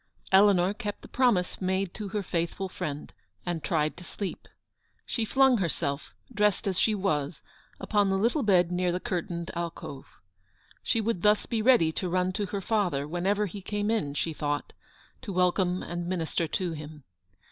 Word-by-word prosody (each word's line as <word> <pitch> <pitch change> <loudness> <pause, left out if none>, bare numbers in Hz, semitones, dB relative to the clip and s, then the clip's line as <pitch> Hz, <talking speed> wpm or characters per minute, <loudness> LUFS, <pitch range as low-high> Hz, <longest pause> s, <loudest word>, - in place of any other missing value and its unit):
Eleanor 190 -1 +5
kept 210 -2 -5
the - - -9
promise 230 -10 +1
made 190 0 0
to 210 - -5
her 205 +1 -2
faithful 170 +2 -2
friend, 150 -5 -5 0.3
and 170 -4 -2
tried 155 -2 +1
to 180 - -11
sleep. 195 +2 -6 0.6
She 230 - -1
flung 265 0 +4
herself, 145 -5 -2 0.2
dressed 210 -2 +2
as 190 -2 0
she 220 - +3
was, 155 -6 -1 0.4
upon 205 -2 +2
the 195 - +2
little 235 +9 +2
bed 180 -6 +4
near 180 0 +1
the 180 - -1
curtained 170 -2 -3
alcove. 170 -5 -5 0.7
She 230 - +1
would 215 -5 -1
thus 210 +1 +4
be 225 -2 -1
ready 220 -9 +5
to 180 +3 -3
run 185 +1 +1
to 200 +2 -2
her 200 +1 -3
father, 180 -10 0
whenever 190 +6 +1
he 200 +1 -7
came 205 +2 -1
in, 170 -11 -1
she 160 +2 -1
thought, 145 -1 -2 0.5
to 240 -6 -6
welcome 180 0 +2
and 175 0 -4
minister 170 -2 -1
to 180 +3 -1
him. 150 -1 -8
185 Hz, 170 wpm, -28 LUFS, 170-205 Hz, 0.7 s, Eleanor